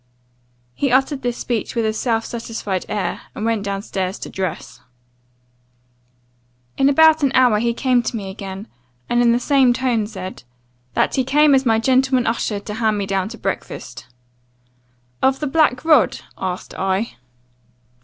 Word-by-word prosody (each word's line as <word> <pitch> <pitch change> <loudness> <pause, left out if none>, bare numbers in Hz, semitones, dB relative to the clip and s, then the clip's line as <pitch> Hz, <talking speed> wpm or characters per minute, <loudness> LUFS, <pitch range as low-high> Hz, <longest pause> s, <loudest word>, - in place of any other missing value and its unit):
"He 275 - -1
uttered 270 +2 +2
this 245 -1 -2
speech 235 0 -3
with 230 -1 +1
a 215 - 0
self 225 0 -1
satisfied 225 -5 -4
air, 210 -2 -2
and 215 - -4
went 225 -2 0
down 200 0 -3
stairs 190 -2 -3
to - - -8
dress. 180 -9 -5 1.9
"In 270 - +3
about 315 +2 +5
an 275 -3 +2
hour 250 -5 +5
he 235 +1 +1
came 250 -1 +2
to 240 - -4
me 195 -3 -6
again; 195 +1 -8 0.4
and 240 0 +2
in 235 -1 +4
the 240 - +2
same 265 -1 +3
tone 240 -4 0
said, 190 -3 -8 0.5
'That - - +2
he 260 - +3
came 290 +3 +4
as 265 -1 +3
my 225 -1 +4
gentleman 260 +1 +2
usher 225 -2 -1
to 210 +1 -7
hand 220 -1 0
me 200 - -2
down 195 0 -1
to 230 - -9
breakfast. 125 - -5 1.1
"'Of 265 0 +2
the 300 - -2
black 300 -1 +2
rod?' 305 -7 +4
asked 185 -1 -5
I. 190 - -1
230 Hz, 165 wpm, -20 LUFS, 200-260 Hz, 1.9 s, about